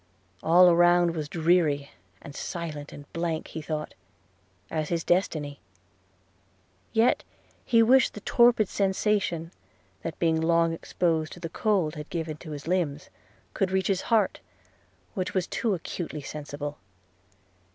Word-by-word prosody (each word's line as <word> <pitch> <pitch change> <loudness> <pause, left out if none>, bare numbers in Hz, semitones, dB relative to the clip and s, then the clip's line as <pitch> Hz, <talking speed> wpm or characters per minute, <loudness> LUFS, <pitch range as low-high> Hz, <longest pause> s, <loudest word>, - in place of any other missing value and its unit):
All 175 +3 +6
around 175 0 +5
was 150 -2 -4
dreary 160 -4 +2 0.3
and 145 - -9
silent; 150 -3 -5
and 145 - -10
blank, 165 -1 -2
he 160 - -6
thought, 150 0 -4 0.8
as 155 -1 -2
his 170 -2 -1
destiny. 155 -6 0 1.3
Yet 225 +2 +3 0.4
he 230 -1 +4
wished 260 +3 +4
the 210 - -7
torpid 235 -2 +4
sensation 190 -4 0 0.5
that 165 - -5
being 160 -1 +2
long 165 0 +3
exposed 165 -1 -1
to - - -11
the 165 -2 -5
cold 185 -5 +1
had 150 -1 -8
given 160 -2 -4
to 155 - -11
his 145 0 -7
limbs 165 -5 -1 0.4
could 195 - 0
reach 190 +1 0
his 190 -2 +1
heart, 220 -4 +1 0.7
which 185 -2 -3
was 185 -2 +1
too 215 0 -1
acutely 160 -2 -5
sensible! 145 0 -6
170 Hz, 135 wpm, -27 LUFS, 155-185 Hz, 1.3 s, All